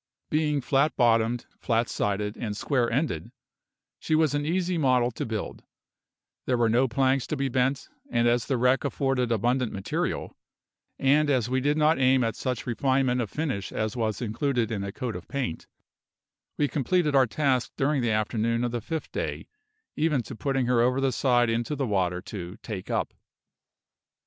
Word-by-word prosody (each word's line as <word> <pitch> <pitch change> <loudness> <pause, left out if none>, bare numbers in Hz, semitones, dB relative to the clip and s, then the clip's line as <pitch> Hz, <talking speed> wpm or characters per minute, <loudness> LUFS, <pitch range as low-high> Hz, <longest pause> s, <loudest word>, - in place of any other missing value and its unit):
Being 150 -2 +1
flat 140 +4 +2
bottomed, 115 -1 +2
flat 115 -1 +1
sided, 105 +1 -1
and 105 -3 -4
square 125 -3 0
ended, 130 -3 -1 0.7
she 155 - 0
was 155 -3 +3
an 145 0 -1
easy 180 +1 0
model 130 -5 +2
to 115 - -4
build; 110 -2 -5 0.8
there 125 - +2
were 115 -1 +3
no 125 +4 +3
planks 130 +1 +1
to 155 - -2
be 135 0 0
bent, 130 +2 0 0.2
and 120 0 +2
as 120 0 +2
the 135 - +1
wreck 125 +2 +3
afforded 135 -3 0
abundant 120 +2 +1
material, 95 -1 -3 0.6
and 145 +2 +3
as 125 -4 +1
we 130 0 +1
did 145 +3 +1
not 155 -1 +3
aim 130 -1 +4
at 115 -1 -1
such 125 -4 -3
refinement 130 +1 +1
of 110 - -3
finish 135 -10 -3
as 110 +2 -2
was 110 -1 -1
included 120 +1 -1
in 100 -3 -2
a 100 - -4
coat 125 0 -4
of 90 - -8
paint, 130 -12 -4 0.9
we 145 - +2
completed 150 +2 +1
our 135 -2 +5
task 130 0 0
during 140 0 +1
the 120 - 0
afternoon 110 +2 0
of 120 - -1
the 120 -1 -3
fifth 160 +7 -5
day, - - -3 0.5
even 150 -5 +1
to 130 - -8
putting 135 +1 0
her 120 -1 +3
over 125 +2 +2
the 135 -1 +1
side 120 -1 +2
into 115 +6 -1
the 140 -1 -1
water 90 -4 0
to 90 -1 -7
"take 100 -5 -6
up." - - -1
125 Hz, 180 wpm, -27 LUFS, 115-140 Hz, 0.9 s, our